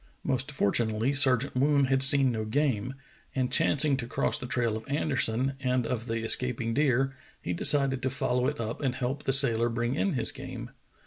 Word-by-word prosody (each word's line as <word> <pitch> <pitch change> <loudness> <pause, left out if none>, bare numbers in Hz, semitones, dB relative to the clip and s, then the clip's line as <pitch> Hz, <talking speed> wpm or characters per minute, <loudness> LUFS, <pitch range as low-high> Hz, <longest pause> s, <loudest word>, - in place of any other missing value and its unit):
Most 135 +1 -2
fortunately 110 +1 0
Sergeant 135 -2 +1
Woon 140 +1 +2
had 135 0 0
seen 135 -1 +6
no 110 -2 -3
game, 130 0 -2 0.4
and 130 -2 -1
chancing 145 -1 +3
to 120 -3 -6
cross - - -1
the 125 - -7
trail 120 -3 -1
of 110 +3 -9
Anderson 135 -3 0
and 125 -2 -1
of 120 -1 -4
the 115 0 -3
escaping 115 0 +1
deer, 135 -1 0 0.2
he 90 - -4
decided 135 - +3
to 130 - -1
follow 125 -1 -1
it 145 +1 -4
up 115 +3 -5
and 130 -3 -2
help 130 +2 -4
the - - +1
sailor 120 -4 +4
bring 120 +1 -2
in 190 +6 -1
his 130 - -1
game. - - -9
130 Hz, 190 wpm, -27 LUFS, 115-135 Hz, 0.4 s, seen